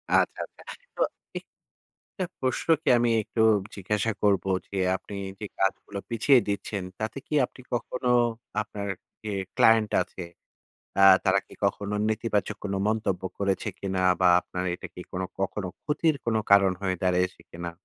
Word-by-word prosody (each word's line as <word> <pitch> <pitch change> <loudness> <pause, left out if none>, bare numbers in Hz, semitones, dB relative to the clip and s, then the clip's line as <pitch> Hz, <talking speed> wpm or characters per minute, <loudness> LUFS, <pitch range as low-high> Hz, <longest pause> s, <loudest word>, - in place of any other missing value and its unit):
আচ্ছা, - - +2
আচ্ছা। - - -19 0.3
তো - - -4 0.4
এ - - -1 0.8
টা 190 - -1 0.2
প্রশ্নকে 155 +5 +1
আমি 120 0 +2
একটু 110 +2 -2 0.3
জিজ্ঞাসা 105 +3 -1
করবো 100 -2 +3 0.2
যে, - - -8 0.2
আপনি 95 +2 -8 0.3
যে 105 - -4
কাজগুলো 100 +1 -1
পিছিয়ে 125 +3 +5
দিচ্ছেন, 100 -1 -2 0.2
তাতে 110 +4 -3
কি - - -6
আপনি 130 - -15
কখনো 125 +1 -2 0.5
আপনার 105 -1 -6 0.4
এ - - -2 0.2
ক্লায়েন্ট 110 -1 +5
আছে, 95 - -6 0.8
আ - - +4 0.2
তারা 95 0 +4
কি - - -14
কখনো 100 +1 0
নেতিবাচক 110 -1 -1
কোন 100 -1 -2
মন্তব্য 105 -4 0 0.2
করেছে 100 -1 0
কিনা 95 -1 -2 0.2
বা, 90 - +5
আপনার 90 0 -5
এইটা 90 - -6
কি - - -8
কোন 95 - -2 0.2
কখনো 95 0 -2
ক্ষতির 155 +1 +1
কোন 115 -1 +1
কারণ 100 -1 +6
হয়ে 95 -1 +1
দাঁড়ায়েছে 90 0 +1
কিনা? 85 0 -5
100 Hz, 150 wpm, -27 LUFS, 95-115 Hz, 0.8 s, কারণ